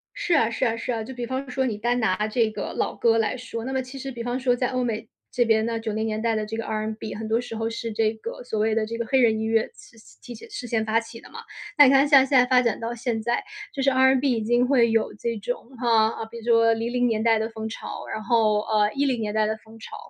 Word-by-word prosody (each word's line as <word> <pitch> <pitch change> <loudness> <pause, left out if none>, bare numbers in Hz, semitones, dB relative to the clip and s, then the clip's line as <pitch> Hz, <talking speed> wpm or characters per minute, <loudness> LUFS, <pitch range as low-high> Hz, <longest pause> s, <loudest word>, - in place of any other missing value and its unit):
是 - - +1
啊， 230 -6 +3
是 235 - -3
啊， 230 -1 0
是 230 - -3
啊， 225 -2 -2
就 265 - -8
比 245 -1 -4
方 260 +2 -4
说 265 +1 -1
你 225 -5 -2
单 240 +3 0
拿 210 -1 +1
这 220 0 +1
个 - - -5
老 - - -1
歌 230 -1 +3
来 225 +2 0
说， 235 -2 -6
那 265 - -4
么 265 - 0
其 260 +1 -9
实 270 0 -6
比 240 -2 -7
方 245 +2 -2
说 250 -1 +2
在 250 0 0
欧 255 -1 -1
美 225 -1 -3 0.2
这 245 - +2
边 220 -1 +2
呢， 230 0 -2
90 220 0 -2
年 215 0 -2
代 230 0 +1
的 215 -1 -1
这 220 +1 -5
个 225 - -4
R&B 215 0 -4
很 220 +1 -5
多 225 +2 +1
时 235 -2 -7
候 225 0 -2
是 230 0 -4
这 220 0 +1
个 225 +2 -8
所 220 -3 -3
谓 220 +1 +1
的 225 -1 +1
这 230 +1 -5
个 235 - -1
黑 265 - +3
人 225 -3 +3
音 220 - -2
乐 225 0 +3
是 230 - -17 0.2
其 240 - -9
事 415 - -8
先 225 -1 0
发 220 +1 +2
起 230 0 -10
的 - - -16
嘛。 - - -9 0.4
那 295 -3 +8
你 260 - +6
看 275 +1 +5
像 280 -2 +7
现 270 - +3
在 250 - +5
发 250 0 +4
展 235 -4 0
到 230 +1 -4
现 235 -1 -2
在， 240 - 0 0.3
就 275 - -3
是 270 - +4
R&B 265 +1 +3
已 225 -3 -1
经 240 +3 +2
会 240 -4 +3
有 225 -1 +1
这 230 +2 -3
种， 240 +3 -5
啊， 225 -2 +2
比 230 +1 -11
如 230 - -10
说 230 -1 +4
00 240 +2 0
年 220 -2 0
代 225 -1 +3
的 220 +1 -2
风 220 -1 -6
潮， 220 - -7
然 215 - -4
后， 215 -2 +3
呃， 210 -1 +1
10 275 -3 0
年 210 -2 -3
代 215 0 +2
的 220 0 -2
风 220 +1 -17
潮， - - -9
230 Hz, 300 characters per minute, -24 LUFS, 220-250 Hz, 0.4 s, 那